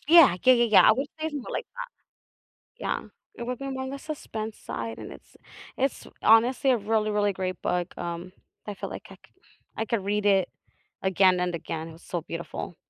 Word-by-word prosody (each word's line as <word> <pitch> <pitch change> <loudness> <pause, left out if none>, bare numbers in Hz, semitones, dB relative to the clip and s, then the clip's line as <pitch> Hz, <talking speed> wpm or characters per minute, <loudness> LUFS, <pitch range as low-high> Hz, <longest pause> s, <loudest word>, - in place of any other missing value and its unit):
Yeah, 320 - +8
yeah, 255 - +8
yeah, 240 -1 +4
yeah, 215 -3 +7
I - - +8
would 270 +5 -1
say 315 - 0
something 290 -4 -6
like, - - -3
that, - - -4 1.0
yeah, - - 0 0.3
it 235 - -6
would 250 -1 -3
be 275 0 -5
more 265 -1 -3
on 265 - -4
the 275 - -5
suspense 225 -8 -6
side, 115 -1 -5
and - - -8
it's - - -15 0.4
it's 270 0 -1 0.2
honestly 240 +4 +5
a 250 - +5
really, 215 0 0
really 205 -1 +2
great 185 -1 -3
book, 180 -1 -1
um, 175 +1 -5 0.3
I 210 - -4
feel 190 - -6
like - - -7
I - - -10
cou - - -24 0.4
I 225 - -1
could 215 -4 -1
read 205 +1 0
it 195 -3 +4 0.5
again 190 -1 +4
and 180 -1 0
again. 160 0 -4
it 165 - -10
was 165 - -15
so 175 -2 -4
beautiful. 170 +1 -6
210 Hz, 210 wpm, -27 LUFS, 180-250 Hz, 1.0 s, Yeah